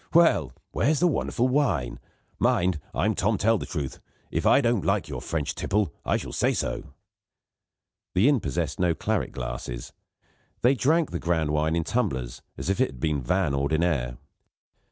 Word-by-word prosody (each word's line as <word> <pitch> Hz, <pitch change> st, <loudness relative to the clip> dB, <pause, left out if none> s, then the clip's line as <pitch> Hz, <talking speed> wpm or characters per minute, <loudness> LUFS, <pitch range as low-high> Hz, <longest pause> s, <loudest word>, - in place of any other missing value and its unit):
Well? 100 Hz, -, +5 dB, 0.2 s
Where's 150 Hz, +1 st, +2 dB
the 180 Hz, -, +3 dB
wonderful 130 Hz, -6 st, +1 dB
wine? 130 Hz, -, 0 dB, 0.4 s
Mind! 90 Hz, -2 st, +2 dB
I'm 110 Hz, +2 st, +1 dB
Tom 105 Hz, +2 st, +1 dB
Tell 110 Hz, +3 st, +3 dB
Truth; 75 Hz, -7 st, -4 dB, 0.3 s
if -, -, 0 dB
I -, -, +6 dB
don't 120 Hz, -6 st, +1 dB
like -, -, +1 dB
your -, -, -5 dB
French 75 Hz, -4 st, -2 dB
tipple, 105 Hz, -1 st, 0 dB
I -, -, +1 dB
shall -, -, -6 dB
say -, -, +2 dB
so." 70 Hz, -, -3 dB, 1.2 s
The 95 Hz, +8 st, +5 dB
inn 145 Hz, -3 st, +4 dB
possessed 70 Hz, -, -2 dB
no 90 Hz, -2 st, +2 dB
claret 105 Hz, -10 st, -1 dB
glasses; -, -, -5 dB, 0.7 s
they 125 Hz, +3 st, +6 dB
drank 155 Hz, +5 st, +2 dB
the 85 Hz, -, -2 dB
grand 80 Hz, -3 st, 0 dB
wine 75 Hz, +2 st, +1 dB
in 85 Hz, -, +1 dB
tumblers 65 Hz, -, -2 dB, 0.2 s
as -, -, -5 dB
if 95 Hz, +6 st, +1 dB
it 130 Hz, -, +4 dB
had 65 Hz, -, -12 dB
been 75 Hz, 0 st, 0 dB
vin 85 Hz, +3 st, +1 dB
ordinaire. 70 Hz, -2 st, +1 dB
Mr. -, -, -14 dB
90 Hz, 170 wpm, -26 LUFS, 70-115 Hz, 1.2 s, I